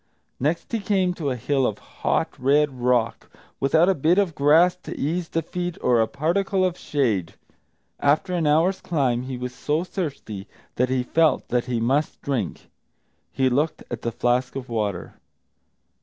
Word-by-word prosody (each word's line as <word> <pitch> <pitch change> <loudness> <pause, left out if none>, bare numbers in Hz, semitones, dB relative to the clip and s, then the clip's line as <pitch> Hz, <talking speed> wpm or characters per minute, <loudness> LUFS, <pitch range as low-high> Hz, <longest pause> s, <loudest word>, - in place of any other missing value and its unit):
Next 155 +6 -1
he 230 - 0
came 190 -3 +1
to 155 -5 -3
a 130 - -1
hill 135 +2 +1
of 105 - -3
hot, - - -1
red 140 0 +2
rock, 120 -2 +1 0.3
without 160 +5 +4
a 195 - +4
bit 165 +3 +2
of 195 -5 +2
grass 155 +6 +4
to - - -8
ease 165 +4 -1
the 165 - -1
feet, 175 +1 -4
or 120 -2 +3
a 110 - +2
particle 185 - 0
of 180 -2 0
shade. 115 - -1 0.6
After 150 +6 +2
an 170 -4 +1
hour's 170 +6 +3
climb 130 -8 0
he 130 0 -5
was 125 0 -5
so 150 +6 -1
thirsty 140 - -5 0.3
that 125 +1 +1
he 130 -1 +1
felt 160 +5 +2
that 120 0 +1
he 125 -2 -1
must 135 +6 0
drink. 125 - -3 0.6
He 130 -1 +1
looked 145 +5 0
at 120 - -4
the 115 - -2
flask 125 +3 0
of 130 -2 -6
water. 105 -6 -2
140 Hz, 170 wpm, -24 LUFS, 125-170 Hz, 0.6 s, without